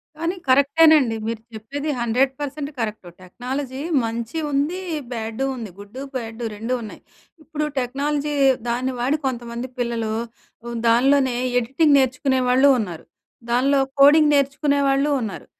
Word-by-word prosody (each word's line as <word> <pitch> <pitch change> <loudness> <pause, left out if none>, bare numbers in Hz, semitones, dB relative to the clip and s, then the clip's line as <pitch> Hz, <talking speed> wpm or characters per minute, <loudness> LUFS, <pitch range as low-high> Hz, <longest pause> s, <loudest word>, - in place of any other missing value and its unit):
కానీ 335 +4 -2
కరెక్టేనండి. 280 -2 +5
మీరు 225 -1 -3
చెప్పేది 280 +8 -5
100% 270 +5 -1
కరెక్టు. 215 -5 -4
టెక్నాలజీ 260 +7 -5 0.2
మంచి 230 +5 -4
ఉంది. 295 +7 0 0.3
బ్యాడు 225 +2 -3
ఉంది. 230 -4 -6
గుడ్డు 210 +7 -9
బ్యాడు 230 -1 -5
2 225 +4 -3
ఉన్నాయి. 215 - -9 0.4
ఇప్పుడు 300 -1 -3
టెక్నాలజీ 285 +4 -2 0.4
దాన్ని 255 +2 -1
వాడి 270 +5 +1
కొంతమంది 240 0 -4
పిల్లలు 230 -2 -2 0.5
హ్మ్, 235 0 -5
దానిలోనే 260 +2 +3 0.2
ఎడిటింగ్ 280 +5 +2
నేర్చుకునే 260 +1 +1
వాళ్ళు 260 +3 +5
ఉన్నారు. 175 -7 -5 0.5
దానిలో 270 +3 +3 0.2
కోడింగ్ 295 +2 +7
నేర్చుకునే 280 +1 +1
వాళ్ళు 275 +2 +2
ఉన్నారు. 215 -4 -6
260 Hz, 125 wpm, -22 LUFS, 235-285 Hz, 0.5 s, కోడింగ్